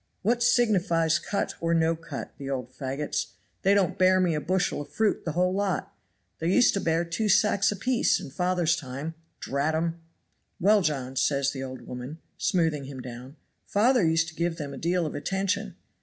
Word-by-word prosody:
'What 235 +4 +2
signifies 185 -9 +3
cut 200 - -2
or 170 0 +1
no 165 0 +2
cut; 165 0 -7
the 140 -1 -5
old 130 -2 -3
faggots 135 +3 -3 0.3
they 195 +1 +4
don't 195 -3 +1
bear 185 0 +5
me 180 -3 +2
a 150 - -1
bushel 180 0 0
of 145 - -9
fruit 220 -1 0
the 160 - -2
whole 180 +2 +2
lot. 195 -1 -2 0.4
They 165 +2 0
used 245 +5 +5
to 200 - 0
bear 165 +1 +1
two 190 +6 -1
sacks 205 0 +4
apiece 240 +5 +1
in - - -8
father's 175 0 +1
time. 140 +1 -6 0.3
Drat 140 +4 -1
'em.' 165 +1 -2 0.6
"'Well, 205 +3 +5
John,' 135 -5 -2
says 140 +1 +2
the 135 - -6
old 130 -1 -6
woman, 125 +5 -7 0.2
smoothing 160 -7 0
him 135 -1 -8
down; 125 +2 -9 0.3
'father 235 +2 +3
used 165 0 +2
to - - -14
give 170 0 -1
them 145 -3 -5
a - - -7
deal 175 +1 +1
of 155 - -4
attention.' 190 +6 -2
165 Hz, 185 wpm, -27 LUFS, 145-190 Hz, 0.6 s, bear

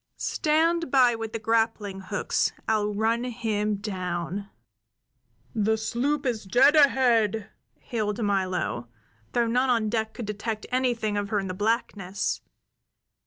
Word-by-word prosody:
Stand 330 +1 +1
by 255 -2 +5
with 225 -1 -5
the - - -2
grappling 220 -3 0
hooks. 190 - -1
I'll 210 -1 +1
run 225 +3 +1
him 220 -4 -1
down!" 190 -1 -4 1.0
"The 220 0 +1
sloop 275 +6 -1
is 235 -4 -1
dead 250 +10 +5
ahead!" 235 -7 +3 0.2
hailed 220 -1 -3
Milo, 185 - -1 0.5
though 240 -1 +3
none 250 +3 +1
on 230 -3 +2
deck 220 0 -2
could 240 - -5
detect 210 +1 -4
anything 240 -5 0
of 205 -1 -2
her 210 - 0
in 195 - -3
the 185 - -3
blackness. 205 -2 -1
220 Hz, 130 wpm, -26 LUFS, 205-245 Hz, 1.0 s, by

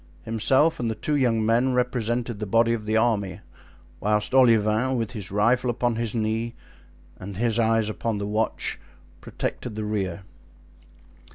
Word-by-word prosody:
Himself 130 +8 +2
and 120 -2 -1
the 110 - -2
two 150 +7 -1
young 115 -5 +2
men 120 +3 +2
represented 120 -2 -1
the 105 - -4
body 115 +3 +3
of 110 -2 -4
the 110 +1 +1
army, 100 -6 0 0.6
whilst 105 +3 0
Olivain, 115 0 +4
with 115 -2 -2
his 105 -6 -6
rifle 120 +5 +2
upon 120 -1 0
his 115 0 -2
knee 110 +1 -1 0.6
and 95 0 -8
his 115 0 +1
eyes 115 -1 +2
upon 110 0 -2
the 100 - -3
watch, 105 +2 -2 0.4
protected 120 -4 -5
the 110 0 -3
rear. 95 -3 -3
115 Hz, 155 wpm, -25 LUFS, 105-120 Hz, 0.6 s, Olivain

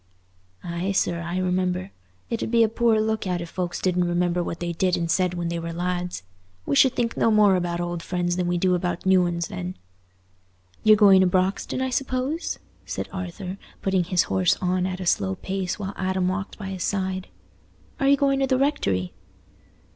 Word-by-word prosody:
"Aye, 175 +3 -2
sir, 170 -3 0
I 170 +2 -3
remember. 185 +1 -1 0.4
It 230 - -1
'ud - - -2
be 230 0 +4
a - - +4
poor 225 0 +2
look 220 -2 -1
out 180 -1 -1
if 170 -1 -6
folks 180 -2 -3
didn't 180 -1 +1
remember 175 0 +1
what 170 -1 -4
they 175 0 -2
did 180 +2 +1
and 170 -1 -1
said 180 0 +1
when 170 -1 -2
they 170 0 -2
were 165 0 -4
lads. 175 - -3 0.4
We 140 - 0
should 260 - +5
think 230 -1 0
no - - +3
more 210 -3 +5
about 175 -1 -1
old 175 -1 -3
friends 175 0 -1
than 180 -1 -1
we 175 0 +1
do 180 +1 +2
about 175 0 -2
new 185 -2 +4
uns, 170 -1 -2
then." 180 -2 -5 1.1
"You're 215 0 +7
going 195 -3 +7
to 185 - +4
Broxton, 185 +7 0
I 260 - -2
suppose?" 265 +5 -2 0.3
said - - -5
Arthur, 185 +1 -5 0.2
putting 190 -2 +2
his 180 -1 +2
horse 95 -2 +2
on 185 0 0
at 185 0 -4
a 185 - -4
slow 95 - +1
pace 190 - -3
while 200 -1 -5
Adam 185 -1 0
walked 195 +2 -4
by 195 -3 -6
his 190 -2 -4
side. 190 -2 -2 0.7
"Are 275 - +2
you 280 0 +6
going 275 -1 +2
to 270 - +2
the 260 -1 +2
rectory?" 100 - 0
185 Hz, 200 wpm, -24 LUFS, 175-200 Hz, 1.1 s, You're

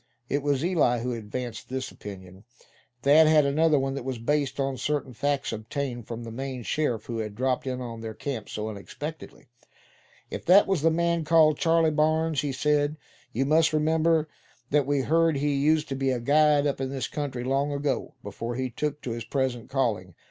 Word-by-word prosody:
It 145 - 0
was 145 +1 0
Eli 150 -10 +2
who 125 +1 -2
advanced 115 +1 -6
this 130 0 -4
opinion. 95 -1 -10 0.6
Thad 155 +3 +6
had 155 -2 +5
another 155 +2 +3
one 135 0 0
that 140 - -5
was 130 -1 -3
based 140 +3 -1
on 135 -1 -1
certain 145 -2 -2
facts 140 +1 -1
obtained 120 +2 -4
from 120 0 -6
the 115 - -7
Maine 130 +1 -5
sheriff 120 -5 -1
who 115 -2 -4
had 105 -2 -4
dropped 130 +2 -1
in 130 -1 -3
on 115 -2 -6
their 110 -1 -6
camp 125 -5 -5
so 105 0 -4
unexpectedly. 120 - -8 0.9
"If - - -5
that 190 +4 +7
was 190 -6 0
the 165 - +4
man 170 0 +1
called 155 -1 +4
Charley 165 -1 +3
Barnes," 155 0 +1
he 145 -1 -2
said, 150 +2 +1 0.3
"you 135 +4 0
must 160 +2 +3
remember 160 +1 +2 0.4
that 145 -2 +2
we 145 -1 +2
heard 165 +3 +2
he 145 +1 0
used 150 +3 +2
to 135 - -2
be 135 0 0
a 130 -2 0
guide 150 +3 +4
up 140 -2 -1
in 135 - -2
this 135 -2 -3
country 135 -5 -4
long 135 +3 0
ago, 140 -1 -2
before 115 +4 -5
he 130 0 -2
took 150 +3 -3
to 125 - -3
his 115 0 -4
present 130 -2 -2
calling. 110 -10 -1
140 Hz, 195 wpm, -26 LUFS, 120-150 Hz, 0.9 s, that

